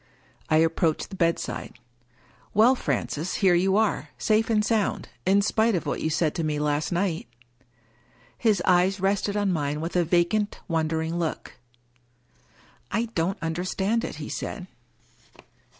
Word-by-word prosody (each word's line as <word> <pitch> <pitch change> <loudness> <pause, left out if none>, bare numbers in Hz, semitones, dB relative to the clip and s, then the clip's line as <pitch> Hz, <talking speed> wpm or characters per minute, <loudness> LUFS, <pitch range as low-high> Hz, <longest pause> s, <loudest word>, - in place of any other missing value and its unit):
I 155 - +3
approached 160 0 +1
the - - -6
bedside. 170 -2 -1 0.4
" - - -32
Well, 225 +5 +6
Francis, 145 - -2
here 190 -3 +4
you 190 +3 +3
are, 220 -1 0
safe 220 +1 +1
and 210 -2 +2
sound, 220 -3 0 0.2
in 200 +1 +4
spite 220 +1 +2
of 170 - -2
what - - -2
you 160 - 0
said 160 -1 +1
to 165 - -2
me 155 -1 -1
last 150 +2 0
night" 175 -4 -1 1.1
His 210 -6 +1
eyes 185 +1 +3
rested 200 +2 0
on 200 -2 +1
mine 150 -2 -1
with 165 +3 -4
a 175 - +4
vacant, 175 +5 +1
wondering 160 0 -1
look. 165 -5 -4 0.7
" 120 -1 -32
I 235 0 -2
don't 175 +4 0
understand 185 +7 -1
it," - - -4
he - - -7
said. - - -5
175 Hz, 150 wpm, -25 LUFS, 160-205 Hz, 1.1 s, Well